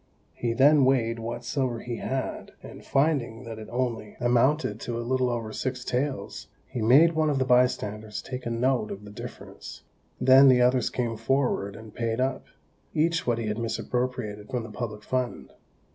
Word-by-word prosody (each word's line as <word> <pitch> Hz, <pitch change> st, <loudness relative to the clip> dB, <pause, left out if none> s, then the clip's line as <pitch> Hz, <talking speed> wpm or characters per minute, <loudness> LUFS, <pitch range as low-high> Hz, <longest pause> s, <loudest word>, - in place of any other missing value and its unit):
He 120 Hz, -1 st, -2 dB
then 140 Hz, +3 st, +5 dB
weighed 120 Hz, -3 st, +2 dB
what 120 Hz, +1 st, -5 dB
silver 125 Hz, -3 st, -1 dB
he 120 Hz, -1 st, -5 dB
had, 130 Hz, -1 st, -4 dB
and -, -, -11 dB
finding 135 Hz, -5 st, 0 dB
that 115 Hz, -2 st, -7 dB
it 110 Hz, -, -9 dB
only 120 Hz, -4 st, -3 dB
amounted 120 Hz, -1 st, +2 dB
to 120 Hz, 0 st, -4 dB
a 120 Hz, -, -4 dB
little 130 Hz, 0 st, +1 dB
over 115 Hz, -2 st, -3 dB
six 130 Hz, -1 st, -3 dB
taels, 135 Hz, +2 st, -3 dB, 0.2 s
he 120 Hz, -, -5 dB
made 140 Hz, +10 st, +6 dB
one 155 Hz, -1 st, +2 dB
of 145 Hz, -, +1 dB
the 130 Hz, -, +1 dB
bystanders 115 Hz, -4 st, +1 dB
take 125 Hz, -2 st, -6 dB
a -, -, -1 dB
note 120 Hz, -1 st, +1 dB
of 100 Hz, +1 st, -7 dB
the 100 Hz, -, -10 dB
difference. 105 Hz, -, -10 dB, 0.4 s
Then 135 Hz, +1 st, +7 dB
the 130 Hz, -1 st, +6 dB
others 125 Hz, -1 st, +3 dB
came 115 Hz, -3 st, -2 dB
forward 115 Hz, -4 st, 0 dB
and 110 Hz, 0 st, -11 dB
paid 115 Hz, 0 st, -2 dB
up, 130 Hz, 0 st, -1 dB, 0.5 s
each 165 Hz, +1 st, +1 dB
what 120 Hz, -1 st, +2 dB
he 115 Hz, -, -3 dB
had 105 Hz, +1 st, -2 dB
misappropriated 115 Hz, -2 st, -3 dB
from 125 Hz, -2 st, -2 dB
the 110 Hz, -, -9 dB
public 105 Hz, -1 st, -5 dB
fund. 130 Hz, 0 st, -3 dB
125 Hz, 180 wpm, -27 LUFS, 115-130 Hz, 0.5 s, Then